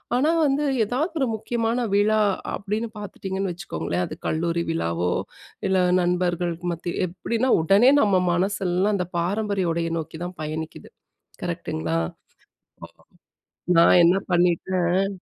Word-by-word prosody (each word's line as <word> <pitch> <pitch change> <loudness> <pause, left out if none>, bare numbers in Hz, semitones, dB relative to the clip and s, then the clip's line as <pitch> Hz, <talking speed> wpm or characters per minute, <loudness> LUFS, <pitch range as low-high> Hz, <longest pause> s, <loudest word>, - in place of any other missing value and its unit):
ஆனா 295 +6 +3 0.2
வந்து, 280 +2 +1 0.2
எதாவது 265 - -1
ஒரு 265 - +2
முக்கியமான 230 +1 -1 0.2
விழா 215 +1 +3 0.3
அப்படீன்னு 215 +3 -3
பார்த்துட்டீங்கன்னு 195 -2 -4
வச்சுக்கோங்களேன், 90 - -3
அது - - -7
கல்லூரி 170 +1 0
விழாவோ, 90 - -1 0.6
இல்ல 190 -1 +2 0.2
நண்பர்களுக்கு 175 -1 -1
மத்தி 170 +1 -5
எப்படின்னா 230 +8 -1
உடனே 200 +10 +5
நம்ம 195 -3 +3
மனசெல்லாம் 190 +2 0
அந்த 180 -1 -2
பாரம்பரிய 195 -1 0
உடைய 165 0 -2
நோக்கி 160 +1 -7
தான் 180 0 -8
பயணிக்குது. 155 +1 -6 0.5
கரெக்டுங்களா? 80 +1 -2 0.9
ஆமா. - - -21 0.8
நான் 170 +1 +7
என்ன 175 +3 +5
பண்ணிட்டேன் 180 +2 +1
180 Hz, 120 wpm, -24 LUFS, 170-205 Hz, 0.9 s, நான்